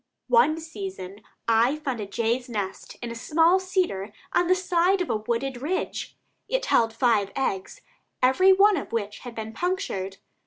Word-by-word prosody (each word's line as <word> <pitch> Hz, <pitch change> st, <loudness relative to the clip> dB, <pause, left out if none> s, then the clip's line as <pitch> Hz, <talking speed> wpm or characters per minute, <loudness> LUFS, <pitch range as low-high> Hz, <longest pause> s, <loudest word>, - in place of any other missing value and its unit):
One 395 Hz, -10 st, +4 dB
season 195 Hz, -, -7 dB, 0.3 s
I 230 Hz, +4 st, +4 dB
found 275 Hz, -6 st, -4 dB
a 205 Hz, -, -5 dB
jay's 235 Hz, +5 st, -1 dB
nest 200 Hz, -4 st, -5 dB
in 235 Hz, -, -4 dB
a -, -, -6 dB
small 325 Hz, +9 st, +3 dB
cedar 365 Hz, -, -1 dB, 0.2 s
on 350 Hz, -, +3 dB
the 370 Hz, -, +5 dB
side 365 Hz, +1 st, +2 dB
of 360 Hz, -, -1 dB
a -, -, +1 dB
wooded 240 Hz, +4 st, -3 dB
ridge. 345 Hz, +7 st, -3 dB, 0.3 s
It -, -, 0 dB
held 225 Hz, -, +3 dB
five 225 Hz, -4 st, +2 dB
eggs, 265 Hz, -, -2 dB, 0.4 s
every 315 Hz, +10 st, +5 dB
one 395 Hz, +1 st, +5 dB
of 285 Hz, -, -5 dB
which 210 Hz, -2 st, -3 dB
had 245 Hz, -2 st, -9 dB
been 220 Hz, 0 st, -6 dB
punctured. 280 Hz, -, -2 dB
250 Hz, 165 wpm, -25 LUFS, 220-360 Hz, 0.4 s, the